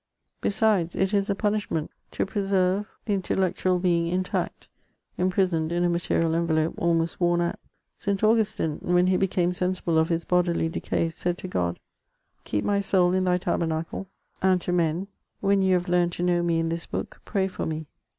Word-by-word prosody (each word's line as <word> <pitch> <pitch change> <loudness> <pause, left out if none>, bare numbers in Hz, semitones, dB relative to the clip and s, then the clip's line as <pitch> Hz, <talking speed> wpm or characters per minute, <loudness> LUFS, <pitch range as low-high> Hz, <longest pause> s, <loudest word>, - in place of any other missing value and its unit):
Besides, 200 -5 +2
it 190 +2 0
is 200 0 +1
a 200 - +1
punishment 205 -6 -1 0.2
to - - 0
preserve 195 0 0 0.2
the 210 - 0
intellectual 185 -1 0
being 175 -2 +1
intact, 180 +2 -2 0.5
imprisoned 180 -3 +1
in 175 +1 +1
a 175 - +3
material 165 -1 +1
envelope 165 -1 +1
almost 165 0 0
worn 175 0 +3
out. 170 0 -1 0.4
St. 200 0 -1
Augustine, 215 -8 +2
when 180 0 +3
he 185 0 +3
became 180 -2 +1
sensible 180 -2 0
of 160 - +2
his 170 -1 -1
bodily 175 -2 +1
decay, 165 0 -1
said 175 +2 -2
to 185 - -7
God: 90 - -1 0.3
'* - - -46
Keep 105 - -1
my 200 -1 +2
soul 185 -2 +3
in 185 0 +1
Thy 180 0 +3
tabernacle;" 165 +1 -2 0.3
and 185 -1 +3
to 180 - -3
men, 175 +1 0 0.3
"When 195 0 +2
you 190 -1 +3
have 180 +1 -1
learned 175 -1 +2
to 175 - -3
know 175 -1 +2
me 170 -1 +1
in 165 0 -1
tins 170 0 -4
book, - - -5
pray 195 -2 0
for 190 - -4
me." 160 0 -4
180 Hz, 180 wpm, -26 LUFS, 170-190 Hz, 0.5 s, a